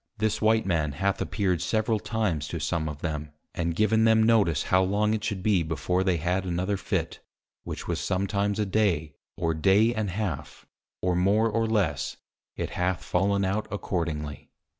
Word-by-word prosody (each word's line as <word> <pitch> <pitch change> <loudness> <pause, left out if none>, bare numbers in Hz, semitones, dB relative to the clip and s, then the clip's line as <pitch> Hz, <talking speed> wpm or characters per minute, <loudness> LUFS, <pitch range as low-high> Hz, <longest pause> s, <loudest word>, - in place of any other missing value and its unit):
This 110 0 0
white 110 0 +3
Man 80 -6 0
hath 95 +6 -1
appeared 95 -5 0
several 110 0 +1
times 100 -11 -1
to - - -4
some 80 -2 -1
of 75 -1 -8
them, 75 -2 -3 0.2
and 85 -1 -2
given 110 +3 +3
them 110 0 +5
notice 110 -8 +3
how 95 - +3
long 105 +3 +1
it 110 -1 -2
should 105 -4 -3
be 100 -4 +3
before 85 +3 -1
they 95 -3 +2
had 90 +4 0
another 95 +2 -1
Fit, - - -2 0.5
which - - -6
was - - -1
sometimes 100 +2 0
a 105 - +1
day, 95 -7 +1 0.2
or 80 0 0
day 100 +8 +4
and 110 -3 -2
half, 90 -6 -4 0.4
or 90 -1 +2
more 100 +5 +3
or 115 +1 +1
less, 105 -6 0 0.4
it - - -4
hath 90 +1 -1
fallen 100 +2 +1
out 100 +3 -1
accordingly. 80 -7 -3
95 Hz, 175 wpm, -27 LUFS, 85-110 Hz, 0.5 s, them